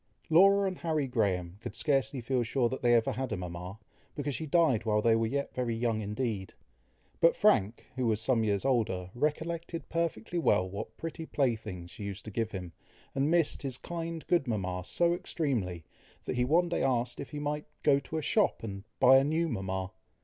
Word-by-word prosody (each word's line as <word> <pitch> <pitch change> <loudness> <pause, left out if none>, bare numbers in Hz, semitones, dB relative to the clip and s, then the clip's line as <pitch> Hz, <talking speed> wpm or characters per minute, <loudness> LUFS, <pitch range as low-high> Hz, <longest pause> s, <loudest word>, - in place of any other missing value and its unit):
Laura 195 +4 +6
and 185 -2 -4
Harry 155 -4 0
Graham 100 -7 -1
could 110 - -6
scarcely 135 0 +1
feel 125 +1 0
sure 120 +1 +1
that 130 - -4
they 120 -1 +5
ever 115 -1 +3
had 130 -1 -3
a - - -1
mama, 90 +2 -6 0.4
because 145 -1 -2
she 160 +4 -4
died 150 -8 +3
while 105 -1 +2
they 115 +1 +4
were 115 0 +1
yet 140 +4 -2
very 120 -3 -1
young 115 -1 0
indeed; 105 -2 -3 0.6
but 165 - +5
Frank, 115 - +2
who 125 -2 0
was 110 -2 +2
some 115 0 +2
years 100 0 0
older, 105 -9 0
recollected 165 +4 -2
perfectly 170 -2 -1
well 95 - +3
what 100 +2 -7
pretty 165 0 -6
playthings 110 -10 -2
she - - -9
used 100 -1 -6
to 110 - -6
give 110 +1 -1
him, 90 -5 -6 0.4
and 140 +2 +1
missed 170 -2 +2
his 135 -3 -3
kind, 165 0 -5
good 170 -6 +2
mama 95 -5 -2
so 170 - +2
extremely, 115 - -2 0.4
that - - -2
he 125 0 +2
one 170 +6 +3
day 170 - -1
asked 125 -2 0
if 140 - -6
he 150 - -7
might 150 0 -3 0.2
"go 140 -2 +5
to 160 - -6
a 155 - -2
shop 210 - +2
and 100 -3 -6 0.2
buy 130 +1 +8
a - - +2
new 160 +4 +1
mama?" 95 - -3
125 Hz, 200 wpm, -30 LUFS, 105-155 Hz, 0.6 s, buy